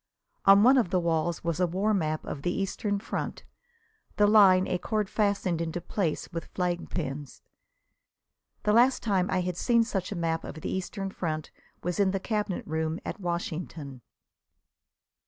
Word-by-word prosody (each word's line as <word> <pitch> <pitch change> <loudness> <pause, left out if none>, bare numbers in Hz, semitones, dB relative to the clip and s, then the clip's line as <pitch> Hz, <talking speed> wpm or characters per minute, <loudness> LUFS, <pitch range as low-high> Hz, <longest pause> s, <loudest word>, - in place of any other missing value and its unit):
On 195 +1 +8
one 260 +3 +7
of 225 - +1
the 185 - +2
walls 170 0 0
was 170 0 -1
a 180 - +3
war 195 +5 0
map 155 -5 -1
of 140 - -5
the 175 - 0
Eastern 200 +2 -1
front, 205 - -4 0.7
the 210 - +4
line 195 -3 +6
a 180 - -1
cord 210 -1 -1
fastened 200 -5 +1
into 165 +1 -2
place 175 -1 -2
with 165 -1 -4
flag 180 -1 -1
pins. 145 -4 -5 1.2
The 210 - +2
last 245 +4 +4
time 195 -5 +1
I 185 -1 +1
had 180 -1 -3
seen 235 +3 +3
such 200 -5 -3
a - - -3
map 165 -1 -1
of 155 - -8
the - - -3
Eastern 195 +1 -3
front 155 -5 -4 0.3
was 180 +3 -2
in 200 -1 +4
the 195 0 -1
Cabinet 210 -2 -2
Room 160 +1 -2
at - - -5
Washington. 165 -6 -4
180 Hz, 170 wpm, -28 LUFS, 165-205 Hz, 1.2 s, On